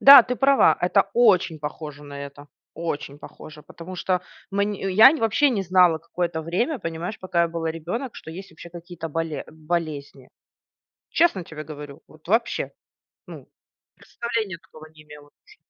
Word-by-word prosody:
Да, 275 Hz, -2 st, +11 dB
ты 250 Hz, +2 st, -3 dB
права. 275 Hz, +1 st, +5 dB
Это 190 Hz, +3 st, +2 dB
очень 190 Hz, -9 st, +4 dB
похоже 150 Hz, -1 st, -7 dB
на 140 Hz, -1 st, -9 dB
это. 140 Hz, +1 st, -12 dB, 0.3 s
Очень 150 Hz, -3 st, -5 dB
похоже, 155 Hz, 0 st, -12 dB
потому 170 Hz, +5 st, -10 dB
что 180 Hz, 0 st, 0 dB, 0.3 s
мань 200 Hz, +1 st, 0 dB
я, 200 Hz, +9 st, +6 dB
вообще, 275 Hz, +3 st, +2 dB
не 210 Hz, -6 st, 0 dB
знала 180 Hz, -3 st, +4 dB
какое-то 170 Hz, 0 st, -3 dB
время, 190 Hz, -, -1 dB
понимаешь, 170 Hz, +2 st, -5 dB
пока 180 Hz, -2 st, 0 dB
я 170 Hz, -, +1 dB
была 165 Hz, -1 st, -3 dB
ребёнок, 180 Hz, -, -5 dB
что -, -, -10 dB
есть 190 Hz, +4 st, -9 dB
вообще 170 Hz, -, -12 dB
какие-то 170 Hz, -1 st, -8 dB
боле 160 Hz, -2 st, -3 dB
болезни. 155 Hz, -4 st, -4 dB, 0.8 s
Честно 330 Hz, -, +2 dB
тебе 155 Hz, -1 st, -8 dB
говорю, 145 Hz, -2 st, -10 dB
вот 155 Hz, 0 st, -19 dB
вообще. 225 Hz, +6 st, 0 dB, 0.6 s
Ну, -, -, -11 dB, 0.5 s
представления 225 Hz, -6 st, -4 dB
такого 155 Hz, -4 st, -15 dB
не 155 Hz, -1 st, -16 dB
имела 150 Hz, -1 st, -14 dB, 0.2 s
ш -, -, -19 dB
170 Hz, 155 wpm, -24 LUFS, 155-200 Hz, 0.8 s, Да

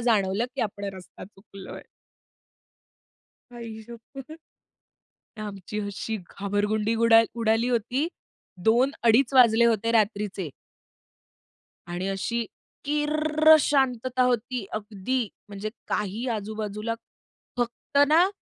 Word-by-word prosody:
जाणवलं, 215 Hz, -2 st, +2 dB
की -, -, -1 dB
आपण 205 Hz, -1 st, -4 dB
रस्ता 185 Hz, -1 st, -11 dB
चुकलोय. 195 Hz, 0 st, -12 dB, 1.7 s
आई 225 Hz, -2 st, -8 dB
शप्पथ! 240 Hz, +5 st, -11 dB, 1.1 s
आमची 210 Hz, 0 st, -6 dB
अशी 205 Hz, +2 st, -4 dB
घाबरगुंडी 210 Hz, +2 st, -1 dB
गुडाल 230 Hz, 0 st, +6 dB
उडाली 225 Hz, +2 st, +2 dB
होती. 245 Hz, +5 st, 0 dB, 0.6 s
दोन-अडीच 245 Hz, +1 st, +3 dB
वाजले 235 Hz, -3 st, +6 dB
होते 230 Hz, -1 st, +2 dB
रात्रीचे. 205 Hz, -5 st, 0 dB, 1.4 s
आणि 175 Hz, +2 st, -3 dB
अशी 230 Hz, +4 st, -2 dB, 0.4 s
किर्रर्र 305 Hz, +1 st, +4 dB
शांतता 255 Hz, -3 st, +1 dB
होती 245 Hz, -2 st, 0 dB
अगदी. 215 Hz, +4 st, -2 dB, 0.3 s
म्हणजे 205 Hz, +1 st, -5 dB, 0.2 s
काही 210 Hz, +5 st, -2 dB
आजूबाजूला. 215 Hz, +1 st, -4 dB, 0.6 s
फक्त 240 Hz, +3 st, -3 dB
ना, 330 Hz, +5 st, +5 dB
225 Hz, 90 wpm, -26 LUFS, 205-250 Hz, 1.7 s, गुडाल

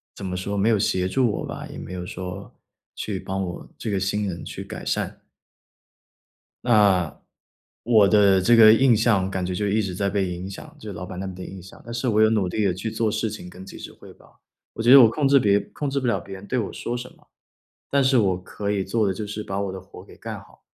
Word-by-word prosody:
怎 100 Hz, -, -7 dB
么 90 Hz, -1 st, -3 dB
说， 100 Hz, +2 st, -3 dB
没 105 Hz, +4 st, +2 dB
有 110 Hz, -, +4 dB
协 95 Hz, -2 st, +1 dB
助 120 Hz, +2 st, +2 dB
我 -, -, -4 dB
吧， -, -, -7 dB
也 -, -, -9 dB
没 90 Hz, -, -8 dB
有 90 Hz, -1 st, -5 dB
说， 90 Hz, +2 st, -7 dB, 0.4 s
去 100 Hz, -3 st, -4 dB
帮 95 Hz, +1 st, -4 dB
我 90 Hz, -1 st, -6 dB
这 -, -, -5 dB
个 100 Hz, -2 st, 0 dB
新 100 Hz, +2 st, -1 dB
人 85 Hz, -3 st, -5 dB
去 -, -, -7 dB
改 -, -, -8 dB
善。 -, -, -3 dB, 1.4 s
那， 100 Hz, -8 st, +3 dB, 0.6 s
我 110 Hz, -4 st, +5 dB
的 100 Hz, -2 st, +5 dB
这 120 Hz, +5 st, +5 dB
个 110 Hz, -1 st, +9 dB
印 125 Hz, -1 st, +5 dB
象 105 Hz, -4 st, +2 dB
感 95 Hz, -1 st, -2 dB
觉 90 Hz, -, -3 dB
就 105 Hz, +3 st, -1 dB
一 110 Hz, +2 st, +2 dB
直 95 Hz, -3 st, -3 dB
在 100 Hz, +2 st, -1 dB
被 100 Hz, 0 st, 0 dB
影 90 Hz, +2 st, -6 dB
响， 95 Hz, -, -10 dB
就 110 Hz, -, -8 dB
是 100 Hz, -, -6 dB
老 90 Hz, -, -6 dB
板 90 Hz, 0 st, -8 dB
那 95 Hz, -, -4 dB
边 95 Hz, -, -7 dB
的 90 Hz, -, -8 dB
印 95 Hz, -1 st, -9 dB
象。 95 Hz, -, -14 dB
但 115 Hz, -, -8 dB
是 120 Hz, +2 st, -2 dB
我 110 Hz, -1 st, +3 dB
有 110 Hz, -, +6 dB
努 105 Hz, -5 st, +1 dB
力 105 Hz, +4 st, -1 dB
地 95 Hz, -3 st, +2 dB
去 105 Hz, +5 st, -4 dB
做 110 Hz, -1 st, 0 dB
事 110 Hz, 0 st, -1 dB
情 95 Hz, -4 st, -8 dB
跟 95 Hz, +1 st, -11 dB
及 95 Hz, -, -10 dB
时 -, -, -9 dB
汇 -, -, -15 dB
报。 -, -, -23 dB, 0.3 s
我 115 Hz, -, -6 dB
觉 120 Hz, -, +2 dB
得 140 Hz, -, +11 dB
我 115 Hz, -, +7 dB
控 140 Hz, +4 st, 0 dB
制 140 Hz, 0 st, +6 dB
别 100 Hz, -3 st, +3 dB
控 145 Hz, +7 st, -5 dB
制 140 Hz, 0 st, -1 dB
不 130 Hz, -, -2 dB
了 115 Hz, -, +1 dB
别 95 Hz, -, -10 dB
人 100 Hz, +2 st, -11 dB
对 130 Hz, -, -1 dB
我 110 Hz, -, -2 dB
说 120 Hz, -, -4 dB
什 125 Hz, +1 st, -6 dB
么， -, -, -27 dB, 0.6 s
但 140 Hz, 0 st, +3 dB
是 130 Hz, 0 st, +3 dB
我 95 Hz, -5 st, +2 dB
可 100 Hz, +1 st, -5 dB
以 100 Hz, -2 st, 0 dB
做 105 Hz, +2 st, 0 dB
的 95 Hz, -, +1 dB
就 105 Hz, +3 st, -5 dB
是 105 Hz, +1 st, -5 dB
把 95 Hz, +1 st, -3 dB
我 100 Hz, -2 st, -2 dB
的 95 Hz, -, -6 dB
活 95 Hz, +1 st, -13 dB
给 -, -, -16 dB
干 -, -, -7 dB
好， -, -, -21 dB
100 Hz, 285 characters per minute, -24 LUFS, 95-115 Hz, 1.4 s, 得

